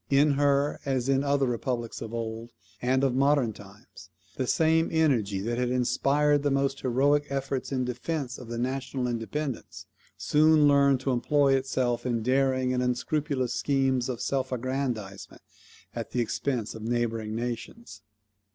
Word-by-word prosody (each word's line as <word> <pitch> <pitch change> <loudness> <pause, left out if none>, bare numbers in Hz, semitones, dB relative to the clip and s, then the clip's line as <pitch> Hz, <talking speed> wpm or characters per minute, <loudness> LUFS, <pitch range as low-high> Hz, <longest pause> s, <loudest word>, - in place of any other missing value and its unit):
In 145 +2 +4
her, 140 0 +1
as 130 -2 -1
in 135 0 +2
other 140 -1 +2
republics 120 -1 -3
of 115 - -6
old 115 0 -5 0.3
and 130 +2 +1
of 135 -2 +2
modern 135 -3 +2
times, 100 0 -15 0.3
the 130 -4 -2
same 160 +3 +2
energy 120 -12 +1
that 120 +3 -2
had 125 -1 0
inspired 140 +4 +2
the 145 - +1
most 135 0 0
heroic 145 +4 +2
efforts 135 -1 -3
in 130 -2 0
defence 130 +2 -4
of 125 - -10
the 120 0 -5
national 130 +1 -2
independence, 125 +3 -4 0.3
soon 155 0 +4
learned 140 -2 +4
to 135 - -1
employ 135 +3 +2
itself 130 -2 0
in 120 -3 -1
daring 130 0 +1
and 125 - 0
unscrupulous 130 +1 -1
schemes 130 -1 +1
of 120 -3 -4
self 130 -1 -1
aggrandizement 125 -6 -4 0.5
at - - -5
the 125 - -2
expense 120 0 -2
of 110 - -9
neighbouring 115 -1 -2
nations. 120 - -6
130 Hz, 150 wpm, -27 LUFS, 120-140 Hz, 0.5 s, In